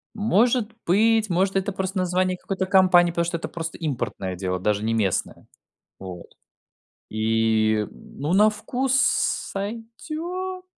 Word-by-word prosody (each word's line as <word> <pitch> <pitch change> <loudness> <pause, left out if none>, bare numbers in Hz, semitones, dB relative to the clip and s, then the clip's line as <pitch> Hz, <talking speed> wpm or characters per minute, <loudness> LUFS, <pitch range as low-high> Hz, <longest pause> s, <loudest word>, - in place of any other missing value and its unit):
Может 220 +2 +2
быть, 220 +4 +3
может, 190 +2 +1
это 195 +1 0
просто 190 +1 -3
название 185 0 0
какой-то 190 0 -3
компании, 185 -2 +5
потому 170 0 0
что 170 0 -2
это - - -5
просто 165 -1 -6
импортное 120 - -3
дело, 95 0 -2
даже 105 +2 0
не 115 +1 0
местное. 100 -5 -1 0.5
Вот. 90 -2 -8 0.8
И, 110 -1 +1
ну, 145 +5 -6
на 210 +3 +5
вкус 250 +5 -2
сойдёт. 310 - -2
185 Hz, 130 wpm, -24 LUFS, -, 0.8 s, компании